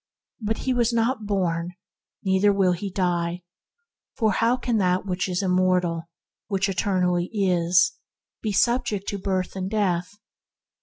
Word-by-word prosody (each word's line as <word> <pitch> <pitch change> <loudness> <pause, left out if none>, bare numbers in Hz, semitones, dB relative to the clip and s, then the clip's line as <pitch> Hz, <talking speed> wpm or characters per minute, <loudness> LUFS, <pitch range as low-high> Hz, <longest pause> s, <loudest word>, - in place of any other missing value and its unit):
But 220 +1 -1
he 260 - -1
was 240 -1 +2
not 230 -1 0
born, 175 -3 -1 0.5
neither 190 +1 +3
will 195 -2 +3
he 185 +3 -3
die, 175 -2 -1 0.7
for 220 -2 +2
how 230 +5 +2
can 240 -2 -1
that 185 -1 +1
which 185 0 -2
is 180 +2 -1
immortal, 180 -3 +1 0.4
which 195 -1 0
eternally 180 -3 0
is, 180 -4 +3 0.5
be 215 - -1
subject 235 -2 +1
to 200 - -3
birth 185 -1 -2
and 190 0 -3
death 190 -3 0
190 Hz, 140 wpm, -24 LUFS, 180-210 Hz, 0.7 s, neither